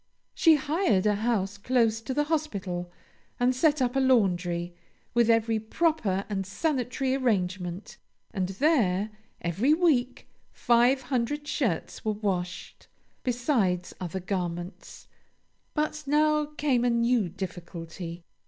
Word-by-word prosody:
She 325 Hz, -2 st, +5 dB
hired 300 Hz, -, +1 dB
a 210 Hz, -, +4 dB
house 205 Hz, -2 st, -1 dB
close 225 Hz, -1 st, +2 dB
by 260 Hz, +3 st, -4 dB
the 295 Hz, -, +3 dB
hospital, 200 Hz, -, -3 dB, 0.5 s
and 245 Hz, +1 st, +3 dB
set 295 Hz, 0 st, +3 dB
up 245 Hz, 0 st, -1 dB
a -, -, +3 dB
laundry, 180 Hz, -9 st, +2 dB, 0.4 s
with 235 Hz, -1 st, +3 dB
every 225 Hz, -1 st, +3 dB
proper 220 Hz, -, 0 dB
and 195 Hz, -2 st, -2 dB
sanitary 260 Hz, -, -1 dB
arrangement, 190 Hz, -7 st, -1 dB, 0.4 s
and 190 Hz, -3 st, -1 dB
there, 210 Hz, -, +2 dB, 0.3 s
every 205 Hz, -, +2 dB
week, 265 Hz, -8 st, +1 dB, 0.2 s
five 245 Hz, +2 st, +3 dB
hundred 280 Hz, +4 st, -2 dB
shirts 225 Hz, -, -2 dB
were 215 Hz, -, 0 dB
washed, 185 Hz, -4 st, -4 dB, 0.3 s
besides 235 Hz, -, 0 dB
other 185 Hz, +1 st, -4 dB
garments. 175 Hz, -1 st, -5 dB, 0.7 s
But 305 Hz, 0 st, -1 dB
now 300 Hz, +1 st, +3 dB
came 290 Hz, -5 st, 0 dB
a 245 Hz, -, +3 dB
new 235 Hz, -4 st, +2 dB
difficulty. 170 Hz, -1 st, -7 dB
230 Hz, 120 wpm, -27 LUFS, 185-270 Hz, 0.7 s, She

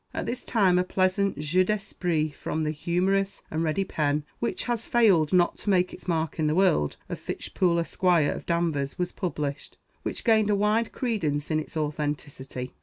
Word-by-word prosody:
At -, -, -2 dB
this 245 Hz, -, -3 dB
time 190 Hz, -6 st, +3 dB
a -, -, +3 dB
pleasant 185 Hz, 0 st, +1 dB
jeu 155 Hz, +5 st, +2 dB
d'esprit 180 Hz, -6 st, -1 dB
from 155 Hz, +2 st, -3 dB
the 155 Hz, -, 0 dB
humorous 185 Hz, +5 st, 0 dB
and 160 Hz, -, -1 dB
ready 165 Hz, +5 st, +1 dB
pen 150 Hz, -4 st, 0 dB, 0.2 s
which 235 Hz, -, -1 dB
has 235 Hz, -2 st, -2 dB
failed 195 Hz, -11 st, +4 dB
not 175 Hz, -1 st, +3 dB
to -, -, -3 dB
make 180 Hz, -2 st, +2 dB
its -, -, -11 dB
mark 160 Hz, -2 st, -1 dB
in 155 Hz, -, +2 dB
the 150 Hz, -, +1 dB
world 175 Hz, -, +2 dB
of -, -, -5 dB
Fitch -, -, -6 dB
Poole, 175 Hz, -3 st, +2 dB
Esq., 170 Hz, +2 st, -4 dB
of 170 Hz, -5 st, +3 dB
Danvers, 165 Hz, -5 st, 0 dB
was 180 Hz, 0 st, -1 dB
published, 150 Hz, -5 st, -4 dB, 0.2 s
which -, -, -4 dB
gained 220 Hz, -3 st, +4 dB
a 205 Hz, -, +3 dB
wide 210 Hz, +3 st, +1 dB
credence 160 Hz, -, -1 dB
in 155 Hz, -, +2 dB
its 155 Hz, -, -6 dB
authenticity. 145 Hz, -4 st, -4 dB
175 Hz, 185 wpm, -26 LUFS, 150-195 Hz, 0.2 s, failed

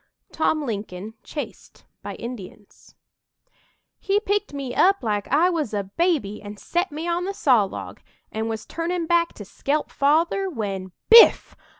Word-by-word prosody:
TOM 310 Hz, -2 st, 0 dB
LINCOLN 205 Hz, -2 st, -5 dB
CHASED 295 Hz, -, -8 dB, 0.2 s
BY -, -, -6 dB
INDIANS 215 Hz, -4 st, -10 dB, 1.0 s
"He 395 Hz, +1 st, +1 dB
picked 415 Hz, 0 st, -1 dB
me 275 Hz, -3 st, -5 dB
up 390 Hz, +3 st, +3 dB
like 210 Hz, -3 st, -1 dB
I 330 Hz, +7 st, +3 dB
was 300 Hz, -11 st, -2 dB
a 200 Hz, -, -1 dB
baby 215 Hz, -, -1 dB
an 205 Hz, 0 st, -9 dB
set 350 Hz, -, -2 dB
me 315 Hz, +3 st, -5 dB
on 345 Hz, +1 st, -1 dB
the 395 Hz, +1 st, -4 dB
sawlog, 230 Hz, -, +1 dB, 0.3 s
an' 220 Hz, +1 st, -3 dB
was 220 Hz, -1 st, -4 dB
turnin' 335 Hz, +1 st, -3 dB
back 340 Hz, 0 st, +2 dB
to 205 Hz, -, -10 dB
skelp 290 Hz, +9 st, -2 dB
Father, 330 Hz, +7 st, +2 dB
when 195 Hz, -, -4 dB, 0.2 s
biff! 460 Hz, 0 st, +8 dB
285 Hz, 150 wpm, -23 LUFS, 210-345 Hz, 1.0 s, biff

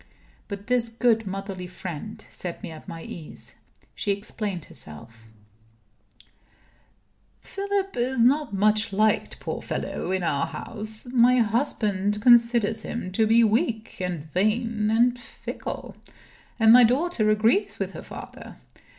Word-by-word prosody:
But 200 Hz, -1 st, -7 dB
this 245 Hz, -1 st, +1 dB
good 225 Hz, -2 st, +1 dB
motherly 195 Hz, -1 st, -5 dB
friend 185 Hz, +4 st, -7 dB
set 175 Hz, -2 st, -7 dB
me -, -, -6 dB
at 155 Hz, -, -12 dB
my 165 Hz, -1 st, -7 dB
ease. 160 Hz, -3 st, -8 dB, 0.4 s
She -, -, -4 dB
explained 200 Hz, -3 st, -3 dB
herself: 115 Hz, +9 st, -12 dB, 2.1 s
"Philip 395 Hz, 0 st, -3 dB
is 245 Hz, +1 st, 0 dB
not 275 Hz, +3 st, +3 dB
much 210 Hz, +2 st, +2 dB
liked, 215 Hz, +2 st, +1 dB
poor -, -, -4 dB
fellow, -, -, -4 dB
in 190 Hz, -1 st, 0 dB
our 140 Hz, -4 st, 0 dB
house. 215 Hz, 0 st, -3 dB
My 250 Hz, +1 st, +5 dB
husband 210 Hz, -4 st, 0 dB
considers 235 Hz, -1 st, +4 dB
him 210 Hz, -6 st, -5 dB
to 220 Hz, +3 st, +2 dB
be 230 Hz, +2 st, +5 dB
weak 225 Hz, 0 st, 0 dB
and 175 Hz, -5 st, -3 dB
vain 215 Hz, +2 st, +1 dB
and 240 Hz, +2 st, +3 dB
fickle. -, -, -7 dB, 0.6 s
And 225 Hz, 0 st, +7 dB
my 250 Hz, 0 st, +9 dB
daughter 250 Hz, -1 st, +2 dB
agrees 220 Hz, -, +2 dB
with -, -, -3 dB
her -, -, -7 dB
father. -, -, -10 dB
215 Hz, 130 wpm, -25 LUFS, 195-235 Hz, 2.1 s, my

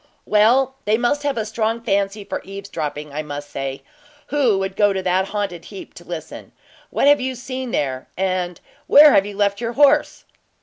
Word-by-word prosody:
"Well, 240 Hz, +6 st, +3 dB
they 215 Hz, +1 st, +2 dB
must 245 Hz, +5 st, 0 dB
have 285 Hz, -3 st, -1 dB
a 220 Hz, -, -1 dB
strong 220 Hz, +1 st, -1 dB
fancy 200 Hz, -2 st, -1 dB
for -, -, -5 dB
eavesdropping, 155 Hz, -7 st, -6 dB
I 150 Hz, -, -2 dB
must 145 Hz, -1 st, -7 dB
say, 135 Hz, 0 st, -5 dB, 0.5 s
who 265 Hz, -8 st, +2 dB
world 190 Hz, 0 st, -3 dB
go 205 Hz, -1 st, +3 dB
to 190 Hz, -1 st, -3 dB
that 185 Hz, +1 st, +1 dB
haunted 200 Hz, -5 st, -4 dB
heap 195 Hz, -2 st, -10 dB
to 175 Hz, -, -13 dB
listen. 170 Hz, -3 st, -8 dB, 0.4 s
What -, -, 0 dB
have 290 Hz, -1 st, +5 dB
you 260 Hz, 0 st, -2 dB
seen 255 Hz, 0 st, -6 dB
there, 130 Hz, -, -2 dB
and 185 Hz, -2 st, -1 dB, 0.3 s
where 295 Hz, 0 st, +8 dB
have 195 Hz, +1 st, +4 dB
you 205 Hz, -1 st, -8 dB
left 200 Hz, +1 st, +1 dB
your 235 Hz, 0 st, -2 dB
horse?" 290 Hz, +3 st, +3 dB
205 Hz, 185 wpm, -20 LUFS, 180-240 Hz, 0.5 s, where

